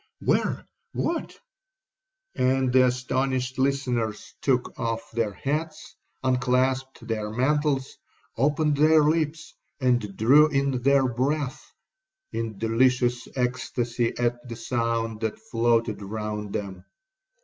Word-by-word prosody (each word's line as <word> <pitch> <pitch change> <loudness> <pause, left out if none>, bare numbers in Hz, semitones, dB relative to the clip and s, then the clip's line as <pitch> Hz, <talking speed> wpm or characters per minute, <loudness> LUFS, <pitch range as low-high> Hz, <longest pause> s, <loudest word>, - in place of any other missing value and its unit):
'—'Where—what?—' 335 -1 -2 0.9
and 130 0 +1
the 130 0 +6
astonished 130 +1 -1
listeners 125 -5 -1
took 130 -3 +1
off 115 0 -3
their 115 -2 0
hats, 155 +6 -4 0.3
unclasped 130 0 0
their 110 -2 -2
mantles, 135 +3 0 0.4
opened 150 +3 +1
their 155 +1 +5
lips, 155 +1 0 0.3
and 120 -7 0
drew 140 +8 +6
in 140 -3 0
their 135 0 +4
breath, 130 +3 -2 0.6
in 115 -3 -4
delicious 120 +2 +2
ecstasy 125 -2 -1
at 120 0 -1
the 115 - -5
sounds 115 -1 -1
that 110 - -2
floated 115 - 0
round 105 0 -4
them. 95 -4 -5
125 Hz, 105 wpm, -25 LUFS, 115-140 Hz, 0.9 s, the